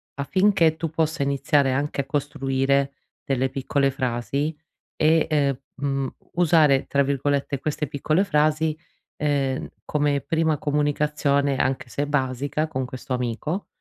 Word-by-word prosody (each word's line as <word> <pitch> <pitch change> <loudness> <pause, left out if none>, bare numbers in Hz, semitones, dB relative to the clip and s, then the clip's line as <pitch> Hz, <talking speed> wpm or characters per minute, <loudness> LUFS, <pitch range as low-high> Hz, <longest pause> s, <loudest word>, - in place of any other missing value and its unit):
affinché 165 +2 +3
tu 165 0 -3
possa 160 -1 0
iniziare 140 0 +2
anche 140 +2 -1
a - - -8
costruire 135 -1 0 0.3
delle 135 -1 0
piccole 135 +1 0
frasi 130 +3 -2 0.4
e, 160 +1 +4
ehm, 140 -4 +2 0.2
mhmm, 135 -1 -2 0.2
usare, 155 -5 +4
tra 140 0 +2
virgolette, 140 0 0
queste 150 0 -2
piccole 155 +6 +1
frasi, 155 -2 +1 0.4
ehm, 140 -3 -1 0.2
come 145 -1 +1
prima 160 0 0
comunicazione, 145 -1 +1
anche 130 0 -1
se 140 +4 -2
basica, 145 +2 -1
con 130 -4 -3
questo 130 +1 -6
amico. 125 - -2
140 Hz, 125 wpm, -24 LUFS, 135-155 Hz, 0.4 s, e